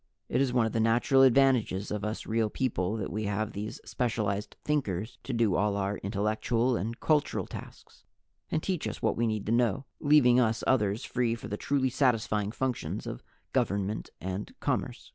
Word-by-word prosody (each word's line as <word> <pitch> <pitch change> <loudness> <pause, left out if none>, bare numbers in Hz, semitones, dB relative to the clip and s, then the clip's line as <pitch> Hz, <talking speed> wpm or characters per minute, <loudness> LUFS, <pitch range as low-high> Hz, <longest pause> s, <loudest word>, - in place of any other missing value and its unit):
It - - +2
is 135 -2 +2
one 120 -2 +3
of 110 - -1
the 115 - -1
natural 120 +5 +4
advantages 130 -7 +4
of 105 -1 -2
us 105 +1 -3
Real 110 -1 +1
People 105 -5 -1
that 100 - -4
we 110 +1 -2
have 105 +1 -1
these 105 +2 -5
specialized 105 -4 -2
Thinkers 120 -6 -1
to - - -5
do 115 -5 +2
all 100 +1 +1
our 100 0 -1
intellectual 110 +5 0
and 115 +2 -3
cultural 150 -2 +1
tasks - - -11 0.5
and 160 - -1
teach 185 -4 -1
us - - -6
what - - +2
we 115 0 +1
need 110 -2 -2
to 110 - -1
know, 120 +2 +2
leaving 140 -4 +5
us 115 -1 +1
others 105 -4 +1
free 120 -2 0
for 115 - -8
the 105 - -2
truly 130 +3 0
satisfying 115 -5 +1
functions 130 +1 -3
of - - -6 0.3
government 100 +2 0
and 95 +3 -5
commerce. - - -2
115 Hz, 180 wpm, -29 LUFS, 105-125 Hz, 0.5 s, leaving